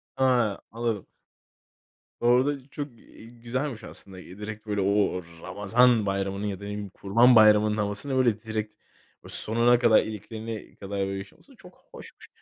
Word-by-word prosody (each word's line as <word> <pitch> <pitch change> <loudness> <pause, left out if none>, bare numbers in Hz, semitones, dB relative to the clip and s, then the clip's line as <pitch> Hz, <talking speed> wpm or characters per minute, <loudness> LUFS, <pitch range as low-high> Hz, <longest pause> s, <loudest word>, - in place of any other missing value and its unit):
Ha, 125 -6 +2
anladım. 115 -3 -3 1.1
Orada 130 +3 +1
çok, 145 -1 -5
eee, - - -16
güzelmiş 120 +1 -5
aslında. 95 -3 -11
Direkt 105 +4 -9
böyle, 105 -1 -1
o - - 0 0.3
o 90 - -7 0.2
Ramazan 110 +4 +2
Bayramı'nın 100 +1 -2
ya 100 - -3
da 95 - -15
ne 100 - -6
bileyim 105 -1 -5
Kurban 115 +6 +4
Bayramı'nın 105 0 +5
havasını, 105 +6 -2
böyle, 115 -5 +2
direkt, 110 -1 -4 0.5
o - - -11
sonuna 120 +2 +3
kadar, 115 -3 +5
iliklerine 110 +1 -7
kadar, 100 0 -6
böyle 95 0 -4
yaşaması 95 0 -12
çok - - -16 0.2
hoşmuş. - - -13
110 Hz, 150 wpm, -26 LUFS, 100-120 Hz, 1.1 s, Bayramı'nın